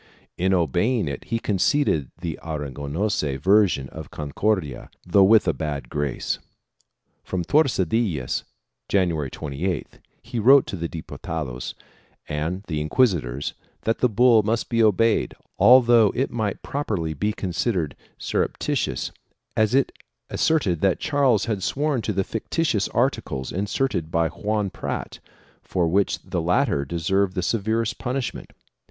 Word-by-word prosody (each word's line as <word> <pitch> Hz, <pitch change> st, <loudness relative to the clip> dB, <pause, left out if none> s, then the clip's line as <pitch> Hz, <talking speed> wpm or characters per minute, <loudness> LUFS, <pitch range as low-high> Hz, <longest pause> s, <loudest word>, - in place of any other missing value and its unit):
In 95 Hz, +2 st, +1 dB
obeying 90 Hz, -, +1 dB
it, 70 Hz, -2 st, -5 dB
he 115 Hz, -, -1 dB
con 105 Hz, -4 st, -2 dB
ceded 110 Hz, -, +2 dB
the 80 Hz, -4 st, -4 dB
Aragonese 75 Hz, +1 st, -2 dB
version 95 Hz, -6 st, +3 dB
of -, -, -8 dB
the -, -, -20 dB
Concordia, 75 Hz, -, -2 dB, 0.2 s
though 95 Hz, +2 st, +5 dB
with 105 Hz, +1 st, +5 dB
a 85 Hz, -, +3 dB
bad 70 Hz, -3 st, -4 dB
grace. 75 Hz, -3 st, -2 dB, 0.8 s
From 90 Hz, -2 st, -2 dB
Tordesillas, 100 Hz, -, +1 dB, 0.5 s
January 85 Hz, -8 st, +1 dB
28th, 75 Hz, +4 st, -4 dB, 0.2 s
he 120 Hz, 0 st, -4 dB
wrote 135 Hz, +5 st, +7 dB
to -, -, -5 dB
the 85 Hz, -2 st, -4 dB
Dipu 80 Hz, -, -8 dB
tados 70 Hz, -7 st, -4 dB, 0.5 s
and 80 Hz, +6 st, -3 dB
the 75 Hz, -6 st, -3 dB
inquisitors 75 Hz, -, +1 dB, 0.3 s
that 115 Hz, -, 0 dB
the 125 Hz, -, +3 dB
bull 115 Hz, 0 st, +5 dB
must 110 Hz, +2 st, -1 dB
be 115 Hz, -1 st, +2 dB
obeyed 110 Hz, +1 st, +3 dB, 0.2 s
although 120 Hz, -4 st, +7 dB
it 130 Hz, -, 0 dB
might 110 Hz, -4 st, -2 dB
properly 100 Hz, -, -2 dB
be 105 Hz, +8 st, -1 dB
considered 90 Hz, -4 st, -2 dB, 0.2 s
surreptitious, -, -, -1 dB, 0.4 s
as 110 Hz, +2 st, +2 dB
it 135 Hz, -, +3 dB, 0.4 s
asserted 100 Hz, -, +1 dB
that 95 Hz, -3 st, +2 dB
Charles 140 Hz, -8 st, +2 dB
had 110 Hz, -4 st, -2 dB
sworn 140 Hz, +4 st, 0 dB
to 110 Hz, -, -2 dB
the 95 Hz, -1 st, 0 dB
fictitious 115 Hz, -, -1 dB
articles 115 Hz, -, -1 dB
inserted 100 Hz, -3 st, -1 dB
by 85 Hz, -1 st, +1 dB
Juan 105 Hz, +3 st, -2 dB
Prat, -, -, -5 dB, 0.4 s
for 90 Hz, -3 st, 0 dB
which 95 Hz, +4 st, +2 dB
the 85 Hz, -, -2 dB
latter 90 Hz, -, +1 dB
deserved 90 Hz, +5 st, 0 dB
the 90 Hz, -, -1 dB
severest 110 Hz, +2 st, 0 dB
punishment. 130 Hz, 0 st, -3 dB
95 Hz, 135 wpm, -24 LUFS, 80-115 Hz, 0.8 s, wrote